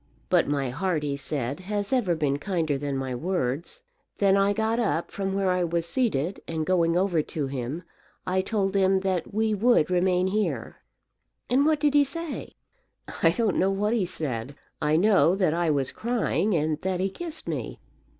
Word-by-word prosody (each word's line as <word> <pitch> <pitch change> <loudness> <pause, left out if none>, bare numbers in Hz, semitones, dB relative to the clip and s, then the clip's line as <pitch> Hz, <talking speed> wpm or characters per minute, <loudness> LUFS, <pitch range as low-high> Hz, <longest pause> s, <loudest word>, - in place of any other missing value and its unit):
'But - - +4
my 140 -3 -1
heart,' 165 +2 -1
he 145 -1 -1
said, 140 0 -3
'has 205 +4 -3
ever 205 -10 +2
been 145 -3 0
kinder 165 -5 -1
than 140 0 -2
my 130 -1 -3
words.' 170 - -2 0.3
Then 195 -1 +4
I 200 0 +3
got 220 +2 0
up 195 -7 0
from 195 -1 -2
where 195 -1 +1
I 180 0 +1
was 170 -1 -1
seated, 180 - 0
and 160 -1 -2
going 170 -1 +2
over 180 -4 +2
to 150 -1 -4
him, 135 +5 -4 0.4
I 185 +1 +1
told 195 -1 -1
him 190 -1 +3
that 185 -3 -1
we 220 +1 +1
would 210 -5 +3
remain 180 0 +2
here." 210 +3 -1 0.7
"And 275 +4 +4
what 310 -1 +3
did 295 -1 +2
he 290 -1 +6
say?" 325 +2 -6 0.7
"I 165 - +6
don't 215 +3 +1
know 190 - +3
what 205 +3 0
he 210 -6 +1
said. 140 -6 -4 0.3
I 150 +1 +2
know 190 0 +4
that 185 -6 +2
I 170 0 +1
was 140 -3 0
crying, 220 -4 0
and 155 -1 0
that 185 -1 -1
he 190 - +1
kissed 330 - -7
me. - - -4
185 Hz, 185 wpm, -26 LUFS, 155-205 Hz, 0.7 s, he